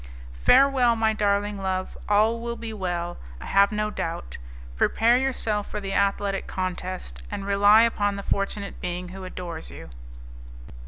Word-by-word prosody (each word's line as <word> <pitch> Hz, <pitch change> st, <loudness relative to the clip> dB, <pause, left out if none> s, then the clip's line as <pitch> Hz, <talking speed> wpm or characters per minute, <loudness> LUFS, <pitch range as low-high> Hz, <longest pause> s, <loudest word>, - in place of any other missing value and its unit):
"Farewell, 260 Hz, -, +5 dB
my 220 Hz, -1 st, +2 dB
darling 205 Hz, -1 st, 0 dB
love; 185 Hz, -1 st, -2 dB
all 215 Hz, +3 st, +3 dB
will 235 Hz, 0 st, -4 dB
be 230 Hz, -1 st, -6 dB
well, 175 Hz, -3 st, -3 dB, 0.2 s
I -, -, -9 dB
have 200 Hz, 0 st, +4 dB
no 210 Hz, 0 st, -1 dB
doubt. 165 Hz, -, -5 dB, 0.4 s
Prepare 230 Hz, -, +3 dB
yourself 225 Hz, -6 st, -1 dB
for -, -, -4 dB
the 195 Hz, -1 st, -4 dB
athletic 200 Hz, 0 st, 0 dB
contest, 185 Hz, -, -4 dB
and 195 Hz, -, -5 dB
rely 205 Hz, +2 st, +6 dB
upon 205 Hz, -3 st, +1 dB
the 200 Hz, -, -6 dB
fortunate 200 Hz, +1 st, -3 dB
being 180 Hz, 0 st, -4 dB
who 190 Hz, 0 st, -8 dB
adores 175 Hz, -3 st, -7 dB
you." -, -, -11 dB
200 Hz, 150 wpm, -25 LUFS, 185-215 Hz, 0.4 s, rely